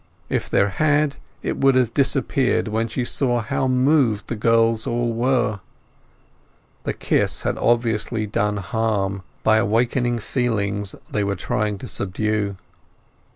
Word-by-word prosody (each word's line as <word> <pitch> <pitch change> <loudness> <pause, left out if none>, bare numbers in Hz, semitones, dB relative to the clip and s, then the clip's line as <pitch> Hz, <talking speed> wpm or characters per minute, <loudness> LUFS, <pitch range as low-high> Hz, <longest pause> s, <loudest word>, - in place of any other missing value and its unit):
If - - -1
there 100 - +3
had 150 +6 +1 0.3
it - - -2
would 135 -1 +4
have 125 -3 +2
disappeared 135 -2 +1
when 110 +2 -1
she 120 +2 -2
saw 120 -1 0
how 115 +3 -1
moved 130 -4 +2
the 120 - -2
girls 115 0 +2
all 120 0 0
were. 120 -3 +1 1.3
The - - -1
kiss - - 0
had - - 0
obviously 115 -2 +1
done 105 0 -1
harm 100 -1 -1 0.2
by 110 0 +5
awakening 120 +3 +1
feelings 105 -5 -1 0.2
they 105 - 0
were 100 0 -1
trying 105 +3 -1
to - - -8
subdue. 100 +1 -2
115 Hz, 135 wpm, -22 LUFS, 105-125 Hz, 1.3 s, by